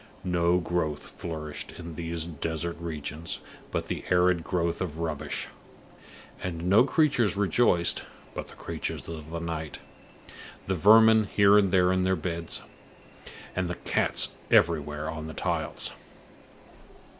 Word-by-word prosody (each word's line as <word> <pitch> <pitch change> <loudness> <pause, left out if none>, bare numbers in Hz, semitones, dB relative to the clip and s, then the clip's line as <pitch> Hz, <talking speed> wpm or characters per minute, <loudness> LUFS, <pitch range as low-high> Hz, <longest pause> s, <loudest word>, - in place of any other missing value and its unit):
No 85 -1 +2
growth 80 -4 -2
flourished 75 -3 -6
in 85 -1 -8
these 85 0 -3
desert 85 +1 -3
regions 80 0 -4 0.3
but - - -3
the - - -4
arid 90 -1 +3
growth 85 0 -1
of 80 -5 -3
rubbish; 75 -3 -3 1.0
and 85 -1 -4
no 105 +7 +6
creatures 130 -8 +2
rejoiced 95 -4 +3 0.3
but - - -5
the - - -14
creatures - - -5
of 80 -2 -7
the 85 - -4
night 80 -2 -4 0.9
the 95 - 0
vermin 110 +4 +6
here 100 0 +5
and 100 -3 +4
there 90 -1 +4
in 95 0 +2
the 95 0 +2
beds, 85 0 -3 0.9
and 90 -1 -1
the 90 - -2
cats - - +1 0.2
everywhere 75 -2 +2
on 80 0 -5
the 80 - -8
tiles. - - -2
85 Hz, 135 wpm, -28 LUFS, 80-95 Hz, 1.0 s, no